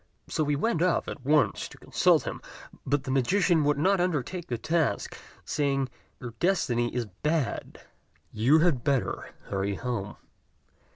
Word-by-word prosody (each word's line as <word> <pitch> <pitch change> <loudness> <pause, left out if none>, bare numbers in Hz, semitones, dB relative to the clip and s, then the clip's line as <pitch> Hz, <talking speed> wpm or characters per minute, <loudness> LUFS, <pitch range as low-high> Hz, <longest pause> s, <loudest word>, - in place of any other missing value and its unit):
So 155 - 0
he 145 0 +1
went 165 +2 0
off 180 -1 +2
at 140 - -7
once 150 +3 +2
to - - -14
consult - - +3
him; - - -5 0.5
but 145 -2 +1
the 130 - -4
magician 165 +5 +3
would 145 -1 +2
not 190 +5 +3
undertake 175 0 -2
the 120 - -2
task, 160 +6 0 0.3
saying, 135 -3 0 0.3
"Your 120 -2 -7
destiny 120 -10 +1
is 125 -2 0
bad: 145 - -2 0.5
you 120 +8 +4
had 155 -6 +2
better 140 -4 -1
hurry 100 0 -2
home." 105 -3 -4
145 Hz, 150 wpm, -28 LUFS, 120-165 Hz, 0.5 s, you